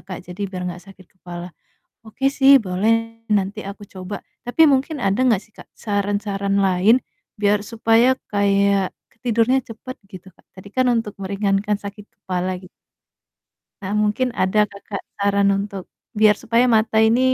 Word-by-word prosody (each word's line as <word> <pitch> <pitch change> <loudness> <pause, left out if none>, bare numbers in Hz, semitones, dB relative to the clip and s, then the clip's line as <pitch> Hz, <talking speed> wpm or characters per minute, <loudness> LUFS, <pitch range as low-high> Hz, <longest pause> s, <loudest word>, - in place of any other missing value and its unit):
Kak, 185 - -5
jadi 180 +3 -9
biar 185 -1 -6
enggak 175 0 -8
sakit 190 -1 -18 0.2
kepala. 175 0 -8 0.6
Oke 270 +5 -1
sih 275 0 +7
boleh, 225 +4 0
nanti 200 0 +1
aku 200 +1 -8
coba. 190 +1 -7 0.3
Tapi 285 +7 +4
mungkin 275 +3 0
ada 195 +2 +1
enggak 230 -7 +3
sih, - - -25
Kak, - - -13
saran-saran 200 -1 -1
lain 195 +6 +4 0.4
biar 205 0 +2
supaya 230 +3 +3 0.2
kayak 200 -1 +2 0.3
tidurnya 235 +2 +3
cepat, 245 +3 -9
gitu, 190 -1 -12
Kak. - - -29
Tadi 190 +2 -12
kan 255 +4 +1
untuk 225 -3 -2
meringankan 200 +1 0
sakit 205 0 -8
kepala, 185 0 -3
gitu. 185 - -13 1.1
Nah, 190 0 -5
mungkin 210 +5 +1
ada 190 +3 +2
Kakak 200 0 -7 0.2
saran 200 0 +2
untuk 195 -2 -5 0.4
biar 215 -1 +6
supaya 230 +2 +2
mata 220 0 +2
ini 225 +2 +4
205 Hz, 150 wpm, -21 LUFS, 195-225 Hz, 1.1 s, sih